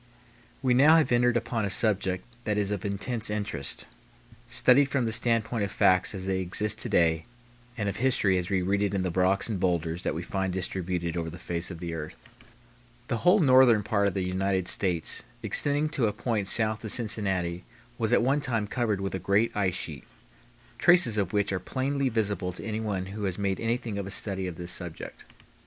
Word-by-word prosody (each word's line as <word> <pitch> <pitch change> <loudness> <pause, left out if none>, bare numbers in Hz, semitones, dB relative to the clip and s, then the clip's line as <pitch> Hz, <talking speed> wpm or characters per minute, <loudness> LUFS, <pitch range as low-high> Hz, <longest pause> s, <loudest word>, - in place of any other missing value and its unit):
We 130 -2 +3
now 145 +6 +6
have 160 -6 +3
entered 120 0 +3
upon 115 -1 -2
a 100 - -1
subject 95 -2 0 0.2
that 105 -1 0
is 105 -1 0
of 100 -3 -3
intense 110 +3 -1
interest, 105 -9 -3 0.6
studied 135 +3 +4
from 130 -4 0
the 110 - -1
standpoint 115 0 +1
of 100 - -3
facts 95 +2 +3
as 95 -1 -4
they 95 -1 -1
exist 105 +4 0
to - - 0
day 80 -2 +2 0.5
and 105 -3 -2
of 100 - -3
history 120 -7 +2
as 90 +1 -5
we 95 -2 0
read 100 +2 0
it 100 -1 0
in 95 - 0
the 90 - -1
rocks 95 +2 +2
and 105 -5 -3
bowlders 85 -2 -1
that - - -2
we 85 - -4
find 95 0 -2
distributed 90 -2 -3
over 85 -1 -3
the 85 - -9
face 85 0 -3
of 90 - -7
the 85 -1 -5
earth. 80 -1 -7 0.9
The 120 - 0
whole 180 - +4
northern 130 -6 +5
part 100 -1 +1
of 100 - -2
the 95 - -1
United 95 0 -1
States 90 -5 +2 0.2
extending 145 +1 +1
to 135 -7 0
a 105 - -2
point 105 -2 -2
south 110 +1 +2
of 110 - -2
Cincinnati 95 -7 -1 0.4
was 110 -1 0
at 120 - +4
one 140 +4 +1
time 115 -6 -1
covered 110 -3 -1
with 95 - -3
a 95 - -2
great 100 +5 +1
ice 95 -4 0
sheet, 75 -4 -4 0.7
traces 175 -11 +5
of 95 -3 -1
which 100 -1 0
are 95 - -1
plainly 135 +6 -1
visible 105 -5 -1
to 90 - -7
anyone 105 -4 -3
who 105 -1 -4
has 95 -2 -2
made 100 -2 -1
anything 115 -2 -2
of 100 - -5
a - - -6
study 95 -1 0
of 90 - -6
this 85 +1 -4
subject. 90 -3 -6
100 Hz, 205 wpm, -27 LUFS, 95-115 Hz, 0.9 s, now